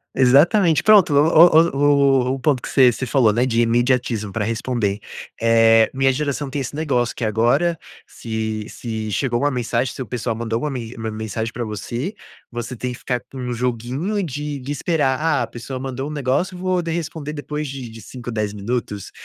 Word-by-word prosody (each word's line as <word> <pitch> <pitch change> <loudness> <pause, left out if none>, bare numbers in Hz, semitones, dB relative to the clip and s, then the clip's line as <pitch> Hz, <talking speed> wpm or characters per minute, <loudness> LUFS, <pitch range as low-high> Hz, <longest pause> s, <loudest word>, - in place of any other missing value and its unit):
Exatamente 155 - +4
pronto, 205 -8 +6
o - - +4
o 160 +2 +6
o 140 -3 +3
o 130 - +1
o - - -7
ponto 130 -1 +1
que - - -6
você 130 -3 +5
você 130 - -4
falou, 120 -3 +3
né, 120 +4 +1
de 120 -2 +1
imediatismo 120 -2 +1
pra 110 +2 -2
responder 110 -2 -1 0.4
eh, 115 -1 +5
minha 135 0 +3
geração 145 0 -2
tem 140 - -3
esse 135 +2 -5
negócio 130 -6 0
que - - -5
agora 120 +11 +2 0.3
se 110 -1 -4
se 110 -2 -5
chegou 120 +1 0
1 145 +1 +2
mensagem, 125 0 -1
se - - -7
o - - -3
pessoal 120 -1 -3
mandou 115 0 -2
uma 150 - -1
me 120 -2 -6
uma 110 -1 -4
mensagem 110 +1 -4
pra 120 - -3
você, 120 - -4 0.4
você 120 +1 -5
tem 125 +2 -4
que 125 - -9
ficar 125 -2 -2
com 135 - -9
um 125 -1 -3
joguinho 125 - -2
de 145 -1 -4
de 135 +3 -6
esperar: 145 -3 0
"Ah, 160 -3 +1
a - - -4
pessoa 125 +2 -7
mandou 135 +1 -4
um - - -6
negócio 150 +7 -1
vou 185 0 0
de 165 -1 -4
responder 160 -2 -4
depois 150 0 -4
de 135 -2 -6
de 115 0 -11
5, 120 +2 -8
10 105 -2 -2
minutos,", 105 -1 -4
125 Hz, 205 wpm, -21 LUFS, 115-145 Hz, 0.4 s, pronto